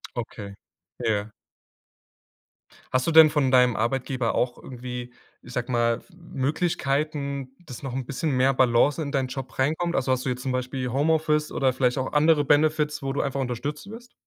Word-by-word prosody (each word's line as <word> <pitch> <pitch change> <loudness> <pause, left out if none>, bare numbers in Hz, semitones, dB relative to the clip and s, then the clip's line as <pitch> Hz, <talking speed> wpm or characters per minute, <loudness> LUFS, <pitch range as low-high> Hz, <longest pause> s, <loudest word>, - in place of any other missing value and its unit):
Okay. 105 -4 -6 0.5
Ja. 110 -1 0 1.6
Hast 130 0 +1
du - - +2
denn 160 -1 +9
von 145 -4 +1
deinem 125 -2 +5
Arbeitgeber 125 +1 -1
auch 120 0 -1
irgendwie, 125 -1 -7 0.3
ich 125 - -12
sage 125 0 -3
mal, 115 -1 +1
Möglichkeiten, 145 -4 -2
dass 130 -3 -9
noch 135 -3 -5
'n 130 0 -3
bisschen 140 +5 -2
mehr 130 +1 +3
Balance 130 +4 +3
in 145 -2 -3
deinen 135 -3 0
Job 130 0 -7
reinkommt? 160 +6 0
Also, 130 -1 0
hast 130 0 0
du - - 0
jetzt 125 0 -3
zum 130 - -2
Beispiel 130 0 -3
Homeoffice 150 +2 +1
oder 130 -2 +1
vielleicht 125 0 +1
auch 130 - -3
andere 150 0 +4
Benefits, 150 +1 +2
wo 135 - -1
du 140 - 0
einfach 140 0 -2
unterstützt 140 +8 -4
wirst? 235 +3 -11
135 Hz, 170 wpm, -25 LUFS, 125-150 Hz, 1.6 s, denn